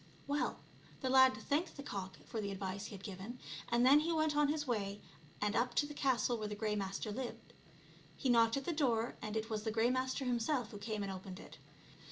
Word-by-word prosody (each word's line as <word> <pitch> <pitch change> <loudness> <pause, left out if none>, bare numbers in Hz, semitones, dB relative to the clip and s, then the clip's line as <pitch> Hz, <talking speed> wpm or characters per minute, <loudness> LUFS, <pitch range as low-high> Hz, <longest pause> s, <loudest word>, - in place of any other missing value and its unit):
Well, 285 +1 -1 0.4
the 260 -2 0
lad 260 -3 +7
thanked 290 +11 -1
the 280 - -6
cock 190 -7 -5
for 225 - -3
the 200 - -2
advice 195 0 -4
he - - -8
had 195 - -11
given, 200 +4 -6 0.3
and 240 +1 +4
then 280 +3 +8
he 320 +3 0
went 315 -2 +2
on 295 0 +4
his 295 0 0
way 205 -5 -1 0.4
and 210 +1 0
up 240 0 +1
to 290 - +4
the 295 - -7
castle 255 -4 +1
where 215 - -2
the 210 - -4
Grey 210 0 -1
Master 195 +1 -2
lived. 230 0 -6 0.6
He - - -1
knocked 230 -1 +5
at 275 - -3
the - - 0
door, 240 -7 +1
and 215 +1 -3
it 220 +1 -3
was 215 -1 -1
the 220 - -2
Grey 225 +2 +3
Master 260 +1 0
himself 245 +1 0
who 205 - -7
came 215 -1 -3
and 195 - -3
opened 190 0 -7
it. - - -12
230 Hz, 230 wpm, -36 LUFS, 210-265 Hz, 0.6 s, then